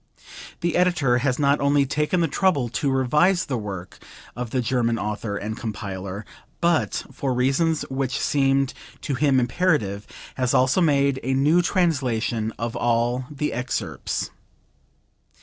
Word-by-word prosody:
The 170 -1 0
Editor 165 -9 +3
has 130 -1 0
not 140 0 +3
only 140 0 +3
taken 150 +5 0
the 165 - +2
trouble 145 -6 +1
to 135 +4 -1
revise 150 +8 +2
the 135 - -2
work 100 -5 -6 0.4
of 120 0 -4
the 130 - -1
German 120 -1 +1
author 105 -1 -3
and 110 +2 -4
compiler, 100 -2 -5 0.3
but, 170 -1 +1
for 130 -2 -2
reasons 140 +5 +1
which 130 -1 -2
seemed 135 -1 +2 0.3
to 145 - -3
him 135 0 +3
imperative, 120 - 0 0.3
has 125 -2 +1
also 130 +8 +3
made 140 -4 +2
a 130 +1 -1
new 150 +6 +4
translation 130 - 0
of 115 0 -3
all 120 +2 +1
the 150 0 -3
excerpts. 125 +2 -3
130 Hz, 140 wpm, -23 LUFS, 120-150 Hz, 0.4 s, new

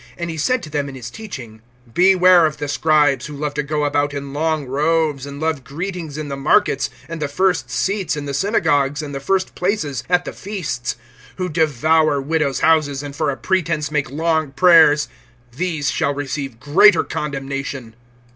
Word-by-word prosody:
(38)And 170 0 -3
he 160 - -6
said 250 +11 0
to 155 - -8
them 145 -1 -2
in 135 - -9
his 120 -2 -8
teaching: 125 - -9 0.3
Beware 185 -1 +6
of 155 - -6
the 145 - -4
scribes, 145 -3 +2
who 150 - -8
love 145 0 -3
to 150 - -1
go 150 +1 -2
about 145 0 0
in 140 -1 -6
long 155 0 -1
robes, 150 +1 0
and 140 0 -8
love 160 -3 -1
greetings 165 +1 -5
in 155 -1 -4
the 140 - -4
markets, 140 +2 +2 0.2
(39)and 165 0 -6
the 150 - -1
first 185 +6 0
seats 195 -5 -1
in 145 - -5
the 140 - -4
synagogues, 145 -5 +1
and 145 -1 -6
the 135 - -3
first 190 +7 -1
places 155 - -2
at 180 0 +2
the - - -6
feasts; 145 - -4 0.4
(40)who 180 -3 -3
devour 155 -1 +2
widows' 145 -1 -1
houses, 145 -3 +2
and 145 -1 -7
for 145 - 0
a 135 - -3
pretense 155 0 -1
make 150 -2 -1
long 160 +1 0
prayers; 160 -2 +6 0.5
these 155 -3 -1
shall 140 - 0
receive 135 -3 -4
greater 155 +10 +5
condemnation. 135 -4 -5
150 Hz, 185 wpm, -20 LUFS, 140-165 Hz, 0.5 s, Beware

